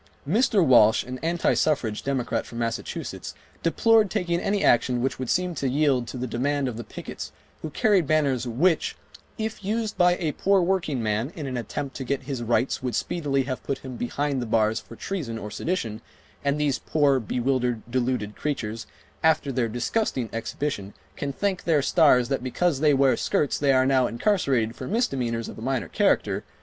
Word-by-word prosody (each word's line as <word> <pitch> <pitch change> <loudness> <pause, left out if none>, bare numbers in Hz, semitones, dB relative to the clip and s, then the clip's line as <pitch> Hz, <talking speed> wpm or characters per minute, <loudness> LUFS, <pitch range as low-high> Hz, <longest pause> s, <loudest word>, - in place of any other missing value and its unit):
Mr. 205 - +3
Walsh, 110 -5 +6
an 125 0 -7
anti 170 +1 +1
suffrage 120 -9 0
Democrat 125 -4 -2
from 115 - -9
Massachusetts, 115 -1 -4 0.3
deplored 220 +5 +4
taking 175 -4 0
any 200 +2 0
action 120 +1 +3
which 130 +1 -1
would 130 -2 -4
seem 180 -1 +1
to 140 -4 -1
yield 135 -3 +2
to 130 - -6
the 125 - -3
demand 135 +3 -1
of 125 - -4
the 120 - -6
pickets - - -8 0.3
who 155 - -4
carried 190 0 +2
banners 140 -5 +1
which 160 +9 +1 0.4
"if 220 -2 -4
used 215 +2 -1
by 175 0 +5
a 160 -3 -1
poor 195 +5 +2
workingman 140 - 0
in 155 - -5
an 130 -2 -4
attempt 125 +4 -4
to 135 - -4
get 135 +1 -2
his 135 -2 -4
rights 120 +3 0
would 125 -2 -2
speedily 140 -5 0
have 130 -1 -4
put 135 - -3
him 130 -1 -6
behind 140 +3 -2
the 120 - -4
bars 110 0 +2
for 115 - -13
treason 140 -8 -4
or 105 -1 -7
sedition, 115 - -3 0.4
and 140 +1 +1
these 145 -3 +1
poor, 145 -3 +2
bewildered, 125 0 -1
deluded 120 -4 -1
creatures, 115 -7 -3 0.4
after 160 -3 +3
their 120 -3 0
disgusting 125 - -1
exhibition 115 -3 -4 0.2
can 140 - -3
thank 190 +5 -2
their 155 -5 +2
stars 140 -7 +4
that 135 -2 -1
because 140 +3 0
they 150 0 +4
wear 135 -1 +4
skirts 145 - 0
they 140 -1 +3
are 130 -1 +4
now 130 -2 +3
incarcerated 125 - +1
for 130 - -7
misdemeanors 125 - -1
of - - -9
a - - -9
minor 125 -6 -1
character - - +1
135 Hz, 185 wpm, -25 LUFS, 120-160 Hz, 0.4 s, Walsh